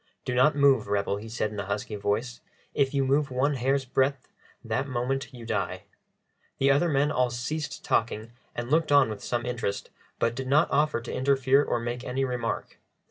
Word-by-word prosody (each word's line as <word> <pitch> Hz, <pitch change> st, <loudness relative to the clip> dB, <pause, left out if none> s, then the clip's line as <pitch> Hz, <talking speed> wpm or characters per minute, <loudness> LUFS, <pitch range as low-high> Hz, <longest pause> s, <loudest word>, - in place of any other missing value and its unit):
"Do 125 Hz, -, -1 dB
not 130 Hz, +4 st, +4 dB
move, 135 Hz, -7 st, +4 dB
rebel," 100 Hz, 0 st, 0 dB
he 110 Hz, +2 st, -8 dB
said 110 Hz, -1 st, -2 dB
in 105 Hz, -, -6 dB
a 100 Hz, -, -3 dB
husky 100 Hz, +1 st, -3 dB
voice. 115 Hz, +4 st, -2 dB, 0.3 s
"If 135 Hz, -2 st, +2 dB
you 140 Hz, -2 st, +1 dB
move 140 Hz, +2 st, +2 dB
one 130 Hz, +3 st, +1 dB
hair's 135 Hz, +1 st, 0 dB
breadth, 130 Hz, +1 st, 0 dB, 0.4 s
that 115 Hz, +4 st, -1 dB
moment 130 Hz, +1 st, -2 dB
you 120 Hz, -3 st, -10 dB
die." -, -, -2 dB, 0.7 s
The 140 Hz, +1 st, +4 dB
other 145 Hz, +5 st, +3 dB
men 145 Hz, 0 st, +2 dB
all 125 Hz, -1 st, +2 dB
ceased 150 Hz, +6 st, -4 dB
talking 115 Hz, 0 st, 0 dB, 0.2 s
and 120 Hz, +2 st, -4 dB
looked 155 Hz, -1 st, +2 dB
on 140 Hz, -5 st, +5 dB
with 105 Hz, -, -7 dB
some 120 Hz, 0 st, -2 dB
interest, 120 Hz, -5 st, -3 dB, 0.3 s
but 115 Hz, -, +1 dB
did 130 Hz, +2 st, -5 dB
not 145 Hz, +4 st, +3 dB
offer 150 Hz, -4 st, +2 dB
to -, -, -6 dB
interfere 135 Hz, +1 st, +3 dB
or 120 Hz, -, -1 dB
make 120 Hz, +1 st, -4 dB
any 130 Hz, +2 st, -1 dB
remark. 125 Hz, -3 st, -3 dB
130 Hz, 190 wpm, -27 LUFS, 115-140 Hz, 0.7 s, on